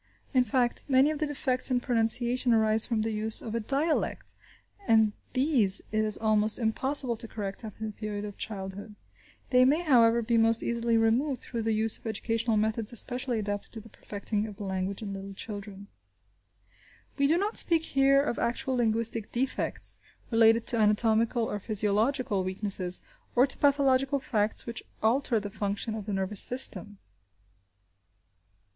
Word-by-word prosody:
In 255 -1 +4
fact, 250 -1 -1
many 270 +2 +3
of 305 - -5
the 305 - -1
defects 265 -3 -1
in 250 -1 +1
pronunciation 240 +1 +2
arise 220 0 +5
from 225 -3 -1
the 225 - -2
use 215 +1 0
of 220 - -7
a 230 - -1
dialect, 280 +8 -2 0.5
and 220 -2 +3 0.2
these 255 -8 +4
it 215 0 0
is 215 -1 +2
almost 215 -1 0
impossible 255 +2 0
to 230 +1 -4
correct 200 -1 -7
after 220 0 -7
the 215 - -5
period 210 -1 -6
of 205 -1 -8
childhood. 200 +1 -7 0.6
They 250 0 +5
may, 295 +7 +2
however, 235 -6 +3
be 230 0 +1
most 225 0 +2
easily 235 -1 0
removed 245 +5 0
through 235 -2 -5
the 225 0 -1
use 220 0 +1
of - - -10
educational 225 +1 -1
methods 220 +1 +1
especially 245 +1 0
adapted 205 -1 -4
to 225 - -7
the 225 +1 -14
perfecting 210 +1 -5
of 205 -2 -11
the - - -7
language 190 +1 -4
in 200 -2 -6
little 195 0 -8
children. 200 -1 -8 1.3
We 280 - +3
do 320 +4 +2
not 410 +4 -2
speak 330 -2 +4
here 275 -1 +2
of 265 - -3
actual 250 +3 -2
linguistic 230 -1 0
defects 260 +2 -1 0.3
related 225 0 +4
to 240 - +2
anatomical 220 +2 +2
or 210 -2 -3
physiological 215 +1 0
weaknesses, 185 -1 -1 0.3
or 250 +2 +5
to 275 - -2
pathological 275 -1 +2
facts 215 -4 0
which 230 -1 -5 0.2
alter 235 +1 +1
the 205 -1 -7
function 205 +2 -3
of 215 -2 -7
the 205 - -3
nervous 195 +1 -1
system. 205 -5 +1
225 Hz, 165 wpm, -27 LUFS, 210-255 Hz, 1.3 s, arise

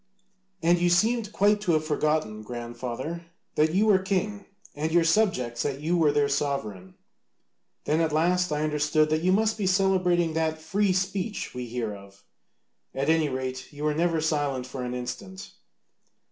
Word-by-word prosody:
And 170 +1 +4
you 175 0 +2
seemed 215 +4 +2
quite 205 0 +2
to 180 -5 +1
have 155 0 +1
forgotten, 150 -7 0
grandfather, 120 +8 -6 0.3
that 155 +2 +2
you 205 +3 +4
were 205 -3 +5
king, 195 +2 -2 0.3
and 155 +2 -2
your 170 0 +4
subjects 165 - +1
that 140 -1 -2
you 160 +4 0
were 160 -4 +4
their 145 -1 +2
sovereign. 135 -10 -3 0.9
Then 155 +2 +1
at 160 -1 +1
last 180 +3 +2
I 150 0 0
understood 150 0 +1
that 155 0 +1
you 185 +2 +2
must 220 +2 +2
be 195 - 0
celebrating 185 -3 +2
that 160 0 -1
'free 190 +5 +1
speech' 190 +3 -2
we 125 -1 -5
hear 115 -2 -3
of; 100 0 -14 0.7
at 140 +3 +1
any 160 -2 +2
rate, 130 0 -5
you 145 0 -8
were 150 0 +1
never 165 +1 +1
silent 145 -5 -1
for 130 0 -7
an 125 0 -4
instant." 125 +11 -7
155 Hz, 170 wpm, -26 LUFS, 135-185 Hz, 0.9 s, were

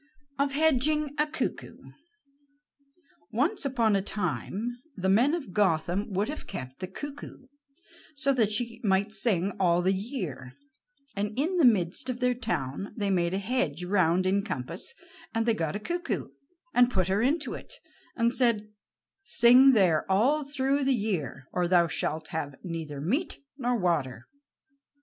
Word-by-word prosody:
OF 280 0 +1
HEDGING 300 0 +2
A 300 - +3
CUCKOO 315 - -5 1.4
Once 290 - 0
upon 235 -6 +2
a 195 - +2
time 210 +5 -3 0.2
the 190 0 0
men 245 - +4
of 270 - -7
Gotham 190 +1 +1
would 200 +3 0
have 300 +2 -6
kept 130 -9 -7
the 185 - -4
cuckoo 280 +6 -8 0.7
so 275 -1 +1
that 225 -5 +2
she 235 +2 -1
might 200 +1 +1
sing 200 -5 0
all 175 -2 +3
the 190 +2 +3
year, 185 - -5 0.6
and 205 +2 -3
in 335 +7 0
the 330 - +5
midst 215 +3 +2
of 245 -1 -3
their 250 -1 +2
town 200 - -4
they 200 -2 0
made 175 -1 +1
a - - 0
hedge 195 - -1
round 180 -1 +2
in 195 +2 +2
compass, 170 - -5 0.4
and 225 0 +1
they 230 - +3
got 165 -4 -2
a - - -2
cuckoo, 350 +10 -3 0.4
and 245 0 +5
put 185 -7 0
her 195 +3 +1
into 280 +3 0
it, - - -8 0.4
and 235 0 +2
said: 230 -5 +1 0.5
"Sing 255 -2 +6
there 180 -8 +3
all 265 +11 +3
through 280 0 0
the 270 -1 +3
year, 175 - -3
or 180 -1 +1
thou 175 -1 +5
shalt 155 -1 -3
have 145 -3 -4
neither 160 -5 -5
meat 260 - -1 0.2
nor 245 -3 0
water." 150 - -1
210 Hz, 155 wpm, -28 LUFS, 180-260 Hz, 1.4 s, Sing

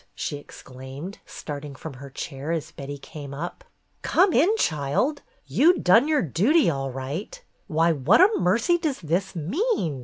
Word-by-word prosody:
she 145 - -3
exclaimed, 135 +6 -10
starting 145 -1 -7
from 155 +2 -8
her 140 +2 -10
chair 140 +2 -5
as 165 -3 -3
Betty 140 +1 -7
came 140 0 -9
up. 175 - -6 0.4
"Come 370 -2 +3
in, 355 - +4
child. 155 - 0 0.2
You 350 +4 +4
done 225 +10 +5
your 310 -2 +2
duty, 200 - +3
all 135 -2 -3
right. 140 - -5 0.3
Why, 165 -1 +2
what 155 - +3
a 400 +5 +6
mercy 230 - +2
does 305 -5 -2
this 180 +4 -1
mean 180 - -1
165 Hz, 155 wpm, -25 LUFS, -, 0.4 s, a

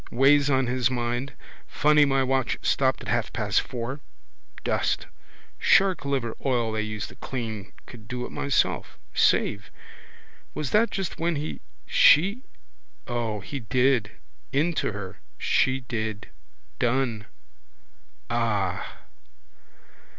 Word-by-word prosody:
Weighs 140 +2 +4
on 135 -1 +3
his 125 0 +1
mind. 120 +1 -2 0.3
Funny 150 0 +4
my 135 -1 +2
watch 130 -1 0
stopped 130 -1 +1
at - - -9
half 115 -3 0
past 105 -3 +1
four. 125 +3 -5 0.6
Dust. - - 0 0.5
Shark 190 -6 +4
liver 130 -5 -1
oil 120 -4 +1
they 110 0 -1
use 110 -1 -4
to - - -14
clean. 110 -7 -5
Could 110 -3 -13
do 125 0 -4
it - - -9
myself. 140 -2 0 0.2
Save. 100 0 +2 0.9
Was 150 -3 -3
that 225 +2 +4
just 195 -3 -4
when 170 0 0
he, 150 +2 -4 0.2
she? 195 - +5 0.6
O, 115 -4 -2
he 140 - -6
did. 125 -1 +1 0.4
Into 155 +2 +1
her. 100 -2 -7 0.2
She 130 0 +2
did. 110 -3 -4 0.5
Done. 120 -3 0 1.0
Ah! 105 -5 -1
125 Hz, 120 wpm, -26 LUFS, 110-140 Hz, 1.0 s, she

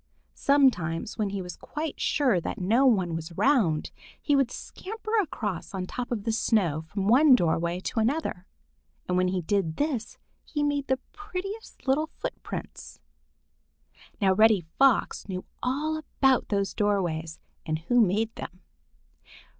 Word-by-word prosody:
Sometimes, 220 - +2
when 210 -2 +1
he 195 -1 -4
was 180 - -7
quite 305 0 -5
sure 250 - +2
that - - -4
no 230 +9 +3
one 185 -9 +2
was 165 +1 -5
around, 190 - +2 0.3
he 290 - +1
would 275 -3 +3
scamper 435 - -7
across 205 - -4
on 185 -1 -2
top 250 +6 -5
of 220 -4 -2
the 225 - 0
snow 190 -8 +1
from 195 +4 -2
one 260 +4 +7
doorway 170 -2 0
to 225 - -2
another, 225 - -1 0.6
and 180 - 0
when 185 0 +3
he 180 -1 -1
did 165 -3 0
this, 285 -7 -2 0.3
he 295 -1 -2
made 285 -1 0
the 265 - +2
prettiest 410 -2 -7
little 295 +4 +2
footprints. - - -7 1.2
Now 195 -3 +4
Reddy 215 -3 +4
Fox 270 -6 +3
knew 185 -1 -4 0.2
all 295 +5 -1
about 270 -4 +1
those 200 -1 0
doorways 175 -6 -1 0.2
and 155 -1 -1
who 235 +10 +2
made 220 +3 +1
them. 185 +1 -9
220 Hz, 145 wpm, -27 LUFS, 180-275 Hz, 1.2 s, one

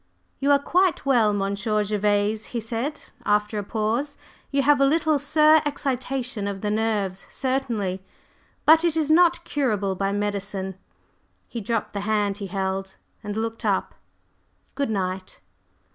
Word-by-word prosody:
"You 280 - +1
are 285 - +7
quite 350 +2 +1
well, 240 -6 +4
Monsieur 205 +2 0
Gervase," 210 +1 0
he 240 - -4
said 230 +7 -4
after 210 +1 +1
a - - -3
pause, 225 +8 -2 0.3
"You 275 -1 +1
have 290 0 +4
a - - +6
little 310 +1 +2
sur 305 +2 +5
excitation 260 -6 -2
of 195 -1 -4
the 210 - -1
nerves, 210 -3 -1
certainly, 230 -9 -2 0.6
but 320 +2 +7
it 335 -2 +2
is 310 -1 +1
not 345 +1 +4
curable 210 - 0
by 195 +1 -1
medicine." 200 -1 -2 0.7
He 235 - -5
dropped 225 +2 -2
the 200 - -2
hand 205 -1 0
he 200 - -4
held, 190 0 -3 0.3
and 205 0 -4
looked 225 +1 -3
up - - 0 0.8
"Good 280 -4 -1
night!" 185 -2 -3
220 Hz, 145 wpm, -24 LUFS, 200-280 Hz, 0.8 s, are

